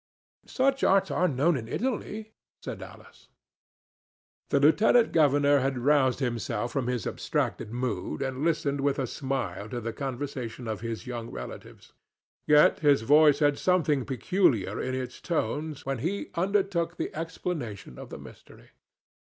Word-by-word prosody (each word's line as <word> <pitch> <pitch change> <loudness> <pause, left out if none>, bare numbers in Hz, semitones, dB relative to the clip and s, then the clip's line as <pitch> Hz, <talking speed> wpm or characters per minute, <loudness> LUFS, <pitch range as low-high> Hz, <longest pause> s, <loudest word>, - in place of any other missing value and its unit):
"Such 270 +1 +1
arts 195 0 +3
are 180 - +2
known 150 +4 +2
in 115 -4 -4
Italy," 220 - -3 0.3
said - - -7
Alice. - - -13 1.2
The 140 - +3
lieutenant 210 - +4
governor 145 -2 +4
had 135 0 -1
roused 130 0 +3
himself 120 -2 -2
from 135 -4 -2
his 125 -4 -2
abstracted 105 - -2
mood, 125 +2 -3
and 135 +1 -3
listened 145 -4 0
with 140 0 +1
a 135 - 0
smile 115 -7 -4
to 120 - -4
the 115 -1 -4
conversation 130 -3 -5
of 110 -2 -4
his 115 0 -5
young 120 -2 -5
relatives. - - -9 0.5
Yet 150 0 +5
his 145 -5 +3
voice 150 +3 +6
had 145 -1 +2
something 155 -8 +2
peculiar 130 - +1
in 130 0 -2
its 125 -1 -5
tones 155 -3 -2
when 135 -2 -2
he 185 - -3
undertook 180 -2 0
the - - -3
explanation 155 - -5
of - - -9
the - - -7
mystery. - - -15
140 Hz, 145 wpm, -27 LUFS, 125-165 Hz, 1.2 s, voice